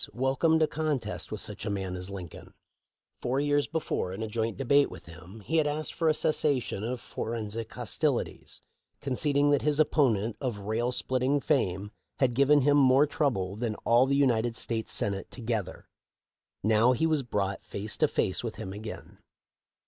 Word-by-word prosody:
welcomed 135 +6 +2
a - - +3
contest 120 - -3
with 110 - -3
such 105 0 -2
a 105 - -2
man 95 -2 -3
as 90 +1 -6
Lin 95 -3 -6
coln. - - -14 0.7
Four 130 +2 0
years 145 0 +1
before, 150 - -2
in 105 +4 -4
a - - -3
joint 115 +1 -2
debate 140 +2 +3
with - - -11
him, 90 +6 -12
he 160 +10 -1
had 155 -2 +3
asked 150 +1 -3
for 165 -2 +1
a - - +4
cessation 140 -10 0
of 120 +2 -3
forensic 115 -1 -5
hostilities, - - -2 0.4
conceding 145 +1 +1
that 145 - +3
his 150 0 0
opponent 120 -8 +2
of 125 -6 -2
rail 110 +4 -1
splitting 130 +3 +1
fame 105 - 0 0.3
had 130 -3 +2
given 140 +3 +4
him 145 +2 +4
"more 135 +1 +6
trouble 110 -11 -1
than 110 0 -2
all 120 +3 +5
the 140 - +2
United 120 -4 +2
States 115 -1 -2
Senate 100 -1 0
together." 110 -6 -4 0.8
Now 110 +4 +4
he 160 - 0
was 155 -3 +2
brought 100 -5 -2
face 105 +1 -4
to - - +3
face - - -1
with - - -4
him 95 - -6
again. 110 +2 -9
120 Hz, 175 wpm, -28 LUFS, 105-145 Hz, 0.8 s, more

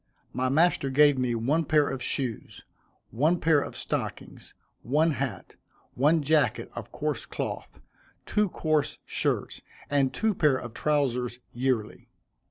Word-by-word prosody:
My 130 +1 0
master 165 0 +2
gave 145 0 +5
me 125 -2 0
one 140 +9 +1
pair 150 -1 +3
of 135 -1 -4
shoes, 125 -3 -3 0.5
one 155 +9 +2
pair 160 -3 +3
of - - -6
stockings, - - -5 0.3
one 155 +6 +2
hat, 130 - -4 0.4
one 150 +4 +3
jacket 145 -5 +1
of - - -8
coarse - - -3
cloth, - - -5 0.5
two 210 -2 +1
coarse 155 -4 0
shirts, - - -1 0.3
and 140 -2 +2
two 220 -1 0
pair 150 -7 +3
of 120 -3 -8
trowsers, 125 -5 0 0.2
yearly. 120 -3 -2
140 Hz, 135 wpm, -27 LUFS, 125-155 Hz, 0.5 s, gave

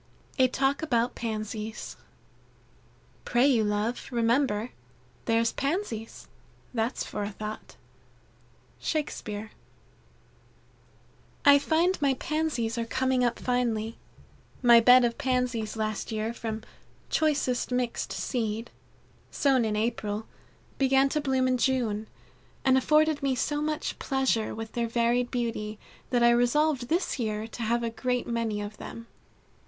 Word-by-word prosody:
A 260 - +6
Talk 270 +2 0
About 245 -6 +1
Pansies. 215 -1 -5 1.3
"Pray 240 +2 +3
you 250 -6 +4
love, 210 +3 -1
remember, 235 -1 +1 0.5
There's 230 0 +2
Pansies 275 - -3 0.5
that's 230 +1 -1
for 205 -1 -4
thought." 215 +1 -7 1.0
Shakespeare. 220 -8 -3 1.9
I 285 0 +8
find 335 +4 +1
my 275 -2 +3
Pansies 260 -7 -1
are 230 - -1
coming 260 +1 +1
up 240 -1 +1
finely. 230 -3 -1 0.6
My 235 -1 +8
bed 250 +2 +7
of 235 -1 -2
Pansies 250 -4 0
last 215 0 -2
year 220 +1 -2
from 220 -2 -5 0.5
"choicest 280 -6 +1
mixed 250 -1 -1
seed" 225 -2 -2 0.6
sown 270 -4 +2
in 215 -1 0
April, 215 -1 -2 0.5
began 270 0 +4
to 300 - 0
bloom 265 -2 +1
in 255 -1 +1
June, 230 -5 0 0.6
and 260 -1 +5
afforded 305 +3 +3
me 275 -2 +1
so 295 +3 -1
much 305 0 -2
pleasure 265 -5 0
with 225 0 -6
their 235 -1 -1
varied 240 +1 +1
beauty, 230 -3 -3 0.3
that 245 -2 +2
I 235 - +7
resolved 245 +2 +2
this 335 -1 0
year 215 -2 -2
to 235 - -8
have 235 +1 +1
a 230 - -1
great 250 +1 -1
many 230 -3 -1
of 205 +1 -6
them. 230 - -8
240 Hz, 125 wpm, -28 LUFS, 225-265 Hz, 1.9 s, I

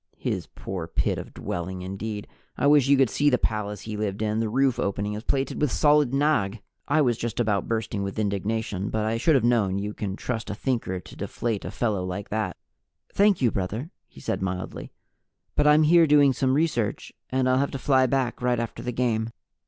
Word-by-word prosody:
His - - -3
poor 90 -4 -6
pit - - 0
of - - -7
a - - -16
dwelling, 90 +1 -5
indeed! 105 +2 -5 0.3
I - - 0
wish 145 -2 +5
you 140 0 +5
could 130 -4 +3
see 145 0 +3
the 125 - +3
palace 105 -3 -2
he 110 -1 -6
lived 105 0 -2
in 110 0 0
the 115 -1 0
roof 130 +1 +2
opening 100 0 -1
is 105 - -4
plated 135 +3 -1
with 150 -4 +2
solid 150 -3 +4
nagh! 135 -8 +1 0.3
I 150 +1 +3
was 120 -4 +1
just 120 -1 -3
about 105 -4 +1
bursting 110 -2 -2
with 100 +1 -4
indignation, 105 -1 -1
but 110 -1 -1
I 110 +1 0
should 150 +6 +3
have 130 - +3
known 110 -6 +2
you 105 +1 -3
can 100 -3 -4
trust 115 0 -4
a 105 - -3
Thinker 115 -6 -2
to - - -13
deflate 115 -4 -3
a - - -3
fellow 105 -6 -1
like 90 +2 -5
that. 110 0 -2 0.6
"Thank 200 -7 +3
you, 120 - +4
brother," 110 - -3 0.2
he - - -15
said 95 - -2
mildly, 95 -1 -4 0.6
"but 150 - +3
I'm 150 +1 +6
here 165 +1 +6
doing 145 -2 +5
some 130 0 +1
research 140 -9 -1 0.2
and 130 0 +1
I'll 130 0 +3
have 140 - +1
to - - -5
fly 130 -1 +3
back 130 -2 -1
right 125 -1 +1
after 115 -1 -4
the 125 - -3
game." 115 -2 0
115 Hz, 215 wpm, -25 LUFS, 105-135 Hz, 0.6 s, I'm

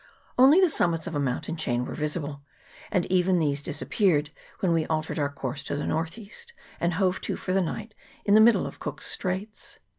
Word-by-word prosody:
Only 270 +7 +7
the 375 - +6
summits 170 - +1
of 170 - -4
a - - +1
mountain 140 +4 -2
chain 125 -6 -1
were - - -6
visible, 150 -2 -3 0.5
and 185 -5 +1
even 185 0 +3
these 145 -3 +1
disappeared 150 0 0 0.3
when 180 -3 +2
we 165 -1 +1
altered 155 0 -2
our 145 -1 +1
course 135 -1 -5
to - - -2
the 145 - -3
north 165 +4 -2
east, 225 - -10 0.3
and 170 0 0
hove 185 0 +1
to - - -2
for 185 - -3
the 195 - +3
night 215 +5 -4 0.3
in 205 - +3
the 215 - +8
middle 230 +1 +5
of - - -8
Cook's - - -5
Straits. 190 +3 -3
170 Hz, 205 wpm, -26 LUFS, 150-195 Hz, 0.5 s, the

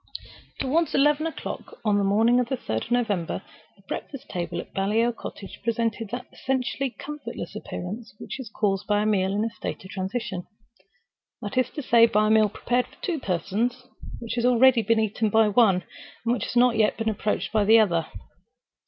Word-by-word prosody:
Toward 320 +5 +1
eleven 295 +3 +3
o'clock, 325 - -7
on 205 -1 +3
the - - +1
morning 225 +5 +4
of 245 - 0
the 265 - -1
third 110 - -3
of - - -13
November, 215 -8 0 0.3
the - - -25
breakfast 275 -4 -6
table 175 -1 -3
at - - -9
Baliol 220 +5 +1
Cottage 200 -3 -9
presented 230 -2 -1
that 245 +3 -5
essentially 265 +1 -1
comfortless 295 +4 -7
appearance 210 +5 -6
which - - -7
is 250 -5 -7
caused 195 -3 -1
by 205 0 +2
a - - -1
meal 190 -3 +2
in 205 +2 0
a 230 - -2
state - - -6
of 185 - -10
transition—that 195 -1 -8
is 255 0 +2
to 295 - -6
say, 230 -2 +6
by 215 -1 +2
a - - +2
meal 215 -1 +5
prepared 245 +4 0
for - - -20
two 340 -5 -1
persons, 225 +6 -1 0.3
which 230 -1 -5
has 240 - -1
been 250 - +5
already 250 0 +6
eaten 220 0 +1
by 220 +1 +4
one, 200 -4 +4 0.4
and 230 - +3
which 245 - -2
has - - -6
not 245 -1 +4
yet 215 -1 +3
been 225 - -2
approached 215 0 -1
by 215 -1 +3
the 220 +3 +7
other. 170 -7 +3
220 Hz, 190 wpm, -25 LUFS, 200-245 Hz, 0.4 s, the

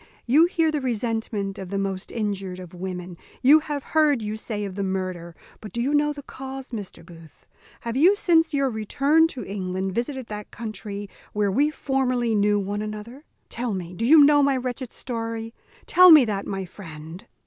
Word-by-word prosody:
"You 290 +7 +5
hear 330 -2 +1
the 300 -2 -2
resentment 225 -4 -2
of 190 -2 -7
the 200 - -2
most 195 -1 -3
injured 195 -4 -3
of 180 -2 -10
women. 180 -1 -6 0.3
You 290 +5 +8
have 295 -2 -4
heard, 300 -6 +2
you 210 0 -3
say, 215 -1 -4
of 195 - -6
the 200 - -4
murder; 185 -3 -3 0.2
but 210 - -9
do 235 - -3
you 265 +5 0
know 295 0 +3
the 285 -1 -8
cause, 265 0 -8
Mr. 200 -7 -7
Booth? 165 -3 -16 0.4
Have 235 0 -4
you 345 +9 +5
since 330 -4 +3
your 275 -2 +1
return 275 +9 +2
to 255 - -7
England 190 -1 -3
visited 255 +4 -3
that 210 -2 -7
country 205 -2 -6 0.3
where 205 -1 +1
we 285 +8 +3
formerly 255 -5 0
knew 205 0 +3
one 205 +1 -3
another? 215 +7 -7 0.2
tell 235 -3 -3
me, 180 -1 -6
do 200 - -5
you 295 +5 +8
know 290 0 +6
my 275 -1 +3
wretched 250 -1 -4
story? 230 -2 -5 0.3
tell 365 +1 +7
me 300 -5 +9
that, 200 -3 -3
my 195 -1 -3
friend." 165 -2 -11
225 Hz, 190 wpm, -24 LUFS, 195-270 Hz, 0.4 s, me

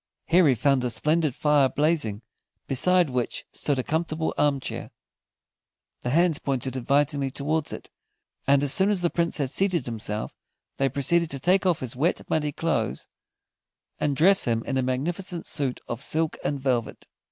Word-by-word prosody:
Here 175 -1 +4
he 130 - +4
found 135 +2 +2
a 125 - 0
splendid 150 +3 0
fire 145 -3 +3
blazing, 145 -9 0 0.4
beside 175 +3 +3
which 125 -1 -2
stood 145 -2 -2
a 130 - -1
comfortable 160 +1 -1
arm 145 -2 +2
chair; - - -6 1.1
the 125 - -4
hands 165 +2 +3
pointed 130 -2 -2
invitingly 140 +2 +1
towards 150 +3 -2
it, - - -9 0.6
and 140 0 +4
as 140 -1 +5
soon 195 +1 +4
as 195 -4 +1
the 175 - +2
Prince 170 -1 0
had 140 -4 -2
seated 180 -5 0
himself 110 -2 -4 0.4
they 135 0 +2
proceeded 155 +5 +1
to 140 - -3
take 185 +6 +2
off 175 -4 +1
his 125 -2 -5
wet, 155 +8 0
muddy 150 -2 +1
clothes, 140 -8 -2 0.9
and 145 -2 0
dress 190 +7 +5
him 115 -1 0
in 135 - -2
a 130 - +2
magnificent 170 +8 -2
suit 140 -5 -2
of 120 +1 -5
silk 160 +2 -1
and 145 - -1
velvet. 125 -3 -2
145 Hz, 170 wpm, -25 LUFS, 130-165 Hz, 1.1 s, as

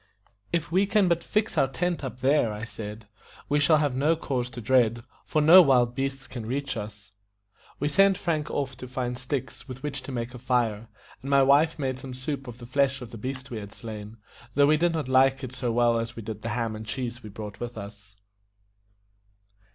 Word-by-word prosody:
"If 165 -2 -1
we 190 +3 +3
can 200 -1 +3
but 170 -1 +1
fix 215 +1 0
our 135 - +4
tent 175 +4 -2
up 130 -1 -6
there," 135 -3 +3
I 105 +1 -6
said, 105 -1 -7 0.4
"we 145 +1 +2
shall 155 +2 +5
have 145 -3 +1
no 145 +6 +2
cause 130 -6 -2
to 120 - -8
dread, 120 -1 +2 0.2
for 155 -1 +1
no 170 +5 +10
wild 125 -6 +4
beasts 135 +1 -3
can 115 -4 -7
reach 140 +2 -2
us." 105 -2 -8 0.7
We 145 - 0
sent 195 +5 +4
Frank 155 -4 -1
off 135 -2 -2
to 125 - -8
find 125 -1 -3
sticks, 125 +1 -5
with 130 +1 -9
which 145 -2 -3
to 130 - -8
make 120 -1 -4
a 125 - -8
fire, 115 -3 0 0.3
and 135 - -6
my 140 -1 +5
wife 145 +4 +4
made 130 -3 -2
some 130 -1 -8
soup 135 +1 -4
of 120 -1 -8
the 120 - -10
flesh 140 +2 +1
of 115 - -10
the 115 - -8
beast 130 +3 -5
we 115 - -4
had 100 0 -10
slain, 110 -1 -8 0.4
though 145 0 +6
we 150 +2 +5
did 170 +1 +2
not 155 -5 -2
like 130 +1 +4
it 130 -1 -6
so 125 -2 -2
well 120 0 +3
as 115 +1 -4
we 115 - -7
did 110 0 -6
the 115 - -4
ham 115 -1 -2
and 110 0 -8
cheese 120 +1 -4
we 110 - -9
brought 105 -1 -8
with 120 -1 -6
us. 105 0 -10
130 Hz, 220 wpm, -27 LUFS, 115-145 Hz, 0.7 s, no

